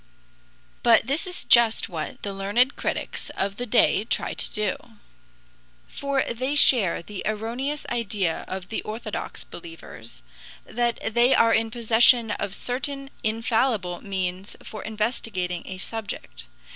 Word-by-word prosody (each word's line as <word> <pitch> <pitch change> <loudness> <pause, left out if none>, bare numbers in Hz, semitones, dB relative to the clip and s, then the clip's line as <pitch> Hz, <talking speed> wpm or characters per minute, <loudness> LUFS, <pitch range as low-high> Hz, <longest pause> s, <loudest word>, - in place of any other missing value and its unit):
But 230 -2 +5
this 290 - 0
is 360 - -5
just 235 -2 +6
what 160 -4 -6
the 200 - -3
learned 205 +7 +2
critics - - -3
of 200 +1 -1
the 245 - -3
day 205 -1 +4
try 225 - -2
to - - 0
do. 210 -3 0 1.1
For 280 -1 -1
they 255 +5 -2
share 220 -12 +4
the 205 +1 -7
erroneous 235 +7 -3
idea 205 -7 -1
of 185 -1 -6
the 220 - -2
orthodox 220 +2 -6
believers 335 -1 -11 0.4
that 240 -1 0 0.2
they 240 +3 +5
are 230 0 +5
in 225 0 +2
possession 230 0 +4
of 200 -1 -3
certain 275 +2 -3
infallible 220 -4 0
means 190 -1 -3
for 215 - -8
investigating 210 -5 -3
a 190 - -6
subject. 225 +3 -6
225 Hz, 130 wpm, -25 LUFS, 200-245 Hz, 1.1 s, just